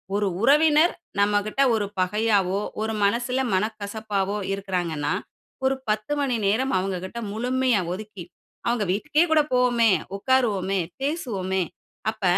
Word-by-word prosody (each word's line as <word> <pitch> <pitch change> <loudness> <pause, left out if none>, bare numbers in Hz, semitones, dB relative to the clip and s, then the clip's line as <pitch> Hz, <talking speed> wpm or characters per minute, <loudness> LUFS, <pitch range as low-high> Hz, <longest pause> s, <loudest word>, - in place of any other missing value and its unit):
ஒரு 205 0 +1
உறவினர் 300 +5 +5 0.3
நம்மகிட்ட 205 +5 +1
ஒரு 210 -2 0
பகையாகவோ! 200 0 +2 0.2
ஒரு 220 0 -1
மனசுல 240 +5 +1
மனக்கசப்பாவோ 205 0 -2 0.2
இருக்கறாங்கன்னா 175 -6 -2 0.5
ஒரு 265 +1 +3
10 215 +6 0
மணி 265 -4 +1
நேரம் 250 +7 +1
அவங்ககிட்ட 190 +3 -3
முழுமையா 250 +1 +1
ஒதுக்கி, 200 -1 -7 0.4
அவங்க 235 -3 +1
வீட்டுக்கே 295 - +2
கூட 310 - +6
போவோமே. 245 -2 +3 0.3
உட்காருவோமே, 200 -4 +1 0.2
பேசுவோமே. 205 - -1 0.5
அப்ப 220 -2 -15
215 Hz, 110 wpm, -24 LUFS, 195-250 Hz, 0.5 s, கூட